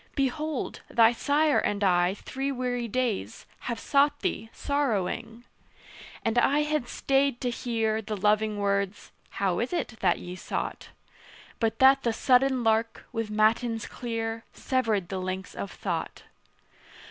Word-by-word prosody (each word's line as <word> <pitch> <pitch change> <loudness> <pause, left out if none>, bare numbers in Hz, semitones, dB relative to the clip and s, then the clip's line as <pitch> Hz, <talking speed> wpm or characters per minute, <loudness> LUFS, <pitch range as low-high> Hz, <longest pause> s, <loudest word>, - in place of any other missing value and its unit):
Behold, 285 +1 -2
thy 230 -1 +5
sire 290 +4 +2
and 205 0 -1
I, 180 0 +3
three 270 +6 -4
weary 245 -2 -2
days, 200 - -2
Have 235 -2 -4
sought 290 +3 +2
thee 220 +2 -2
sorrowing." 235 -4 -2 0.8
And 225 +1 +3
I 290 +4 +3
had 300 -4 -1
stayed 275 -1 +1
to 245 - 0
hear 225 -2 -1
The 215 0 -4
loving 210 +1 +2
words 200 -1 -1 0.3
"How 195 -3 +1
is 240 - -1
it 355 - -1
that - - +3
ye 180 0 -7
sought?" - - -4 0.7
But 225 -1 0
that 270 +1 +6
the 235 -3 0
sudden 255 +2 +3
lark, 225 0 +1
with 225 -3 -3
matins 220 +1 +2
clear, 225 -1 -4
Severed 225 -8 0
the 190 - -3
links 185 0 -4
of 200 - -5
thought. - - -4
230 Hz, 140 wpm, -27 LUFS, 210-265 Hz, 0.8 s, that